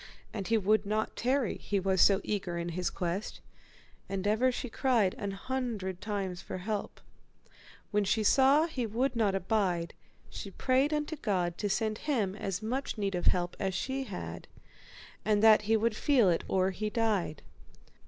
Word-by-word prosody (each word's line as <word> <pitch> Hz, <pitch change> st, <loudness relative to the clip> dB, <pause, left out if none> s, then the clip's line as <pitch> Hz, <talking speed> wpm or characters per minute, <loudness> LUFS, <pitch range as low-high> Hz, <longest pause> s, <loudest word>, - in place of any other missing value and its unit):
And 200 Hz, -4 st, -4 dB
he 230 Hz, -, +3 dB
would 215 Hz, 0 st, +2 dB
not 215 Hz, +1 st, -1 dB
tarry, 255 Hz, 0 st, 0 dB
he 200 Hz, -, -1 dB
was 190 Hz, -1 st, +2 dB
so 195 Hz, 0 st, +5 dB
eager 185 Hz, -4 st, -2 dB
in 170 Hz, 0 st, -3 dB
his 180 Hz, +2 st, -1 dB
quest, 180 Hz, +3 st, -3 dB, 0.7 s
and 195 Hz, 0 st, -3 dB
ever 220 Hz, +5 st, +3 dB
she 250 Hz, -, -4 dB
cried 230 Hz, -5 st, +2 dB
an 200 Hz, -, -2 dB
hundred 205 Hz, -3 st, -3 dB
times 195 Hz, -4 st, -3 dB
after -, -, -6 dB
help. 205 Hz, +3 st, -4 dB, 0.9 s
When 210 Hz, 0 st, +2 dB
she 215 Hz, +2 st, +1 dB
saw 275 Hz, +7 st, +5 dB
he 260 Hz, -8 st, -3 dB
would 245 Hz, +4 st, 0 dB
not 210 Hz, -4 st, +2 dB
abide, 185 Hz, -4 st, 0 dB, 0.3 s
she 200 Hz, -, -7 dB
prayed 260 Hz, -, +1 dB
unto 300 Hz, +1 st, -2 dB
God 180 Hz, -8 st, -1 dB
to 205 Hz, -, -1 dB
send 215 Hz, +2 st, -1 dB
him 225 Hz, -11 st, -1 dB
as 195 Hz, 0 st, -4 dB
much 255 Hz, +3 st, -2 dB
need 200 Hz, -2 st, -1 dB
of 175 Hz, -1 st, 0 dB
help 175 Hz, -1 st, +1 dB
as 190 Hz, -2 st, -1 dB
she 265 Hz, +7 st, -2 dB
had, -, -, -7 dB, 0.8 s
and 210 Hz, -1 st, +2 dB
that 220 Hz, -1 st, +7 dB
he 225 Hz, -, +5 dB
might 225 Hz, +1 st, +1 dB
feel 240 Hz, -, +3 dB
it 165 Hz, -, 0 dB
or 190 Hz, 0 st, +2 dB
he 215 Hz, +3 st, -3 dB
died. 210 Hz, -, -1 dB
210 Hz, 175 wpm, -30 LUFS, 190-235 Hz, 0.9 s, that